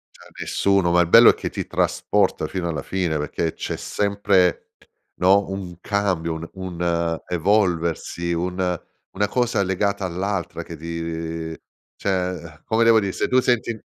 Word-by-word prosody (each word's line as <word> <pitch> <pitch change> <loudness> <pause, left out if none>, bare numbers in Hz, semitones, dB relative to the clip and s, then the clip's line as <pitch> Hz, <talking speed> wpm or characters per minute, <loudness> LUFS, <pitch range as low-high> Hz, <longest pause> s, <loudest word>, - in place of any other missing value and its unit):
Cioè - - -16
a - - -20
nessuno, 100 -3 +1
ma 90 0 +5
il 85 - +1
bello 115 +6 +9
è - - +6
che - - -4
ti - - -4
trasporta - - +1
fino 90 -3 -3
alla 80 - -3
fine 90 -5 -1
perché 75 +2 -2
c'è - - -4
sempre, 100 -3 +1 0.5
no, 95 +2 +4
un 95 -3 -6
cambio, 95 -5 0
un 80 +1 -6
un 85 -3 -2
evolversi, 85 -2 0
un 90 0 -1 0.3
una 105 +1 0
cosa 120 -3 +1
legata 100 +1 0
all'altra 90 0 -3
che 85 - -9
ti 80 0 -5 0.4
cioè, 90 -3 -2
come 115 +1 +2
devo 115 -1 +6
dire, 100 -2 -2
se - - -1
tu 130 - +4
senti 120 -2 +1
90 Hz, 155 wpm, -22 LUFS, 85-100 Hz, 0.5 s, bello